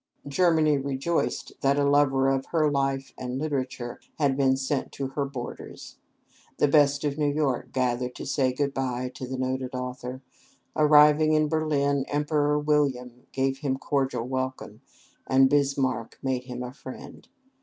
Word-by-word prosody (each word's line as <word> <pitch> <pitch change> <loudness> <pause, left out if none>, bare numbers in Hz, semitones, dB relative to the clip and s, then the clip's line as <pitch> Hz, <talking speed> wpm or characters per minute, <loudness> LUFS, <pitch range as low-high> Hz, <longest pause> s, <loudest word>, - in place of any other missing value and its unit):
Germany 155 -1 +3
rejoiced 140 +5 -2
that 140 +1 +2
a 145 - +2
lover 140 -2 +3
of 135 0 0
her 155 -3 +2
life 135 -1 -1
and 125 0 -4
literature 130 -4 -3 0.2
had 140 -3 +2
been 135 -1 +3
sent 135 +1 -2
to 135 -1 -4
her 140 +1 -2
borders. 130 -3 -8 0.6
The - - +3
best 145 -1 +3
of 145 0 -2
New 145 -1 +2
York 145 -4 -1
gathered 125 -1 -1
to - - -7
say 130 -3 +1
good 140 +2 -1
by 125 -1 -2
to 130 - -7
the 130 +1 -4
noted 130 0 -2
author. 125 +1 -5 0.5
Arriving 150 +1 +6
in 155 0 +3
Berlin, 145 -3 +1
Emperor 150 0 +1
William 135 -5 0
gave 135 0 -1
him 135 -2 -1
cordial 135 -4 -1
welcome, 130 0 -4 0.5
and 130 0 +4
Bismark 135 -5 0
made 130 -1 -1
him 125 -1 -6
a 125 0 -7
friend. 130 -1 -11
135 Hz, 155 wpm, -26 LUFS, 130-145 Hz, 0.6 s, Arriving